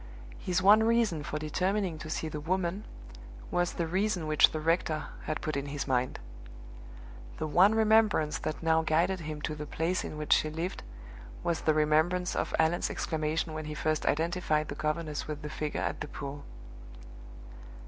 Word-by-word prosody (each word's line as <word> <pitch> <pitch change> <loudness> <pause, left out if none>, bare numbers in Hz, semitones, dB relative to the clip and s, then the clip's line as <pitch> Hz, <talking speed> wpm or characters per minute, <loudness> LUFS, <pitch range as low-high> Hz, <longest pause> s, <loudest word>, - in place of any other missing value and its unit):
His 185 0 -1
one 210 +3 +7
reason 225 -8 +2
for 150 - -4
determining 180 +3 -1
to 155 +1 -7
see 160 - -2
the 150 -1 -5
woman 185 +4 -1 0.7
was 175 0 +1
the 170 - -1
reason 185 0 0
which 155 -1 +5
the 155 - -3
rector 160 -1 0 0.2
had - - -3
put 155 - -2
in 140 0 -2
his 140 -1 -4
mind. 130 -1 0 1.2
The - - -2
one 185 +7 +5
remembrance 220 -8 +3
that 155 - -4
now 160 0 +3
guided 170 +4 +1
him 155 -2 -6
to 155 - -2
the 150 0 -6
place 165 +5 -1
in 155 - -6
which 150 -1 +2
she 155 - +2
lived 165 +4 -4 0.6
was 170 -1 0
the 155 - +2
remembrance 160 +4 +2
of - - -1
Allan's 160 +2 +2
exclamation 155 0 -2
when 155 0 -5
he 150 0 -5
first 155 0 -1
identified 160 -1 +1
the - - -3
governess 155 +1 -2
with 150 -1 -5
the 150 - -5
figure 150 -1 -3
at - - -3
the - - -3
pool. 145 0 -7
160 Hz, 175 wpm, -30 LUFS, 150-180 Hz, 1.2 s, one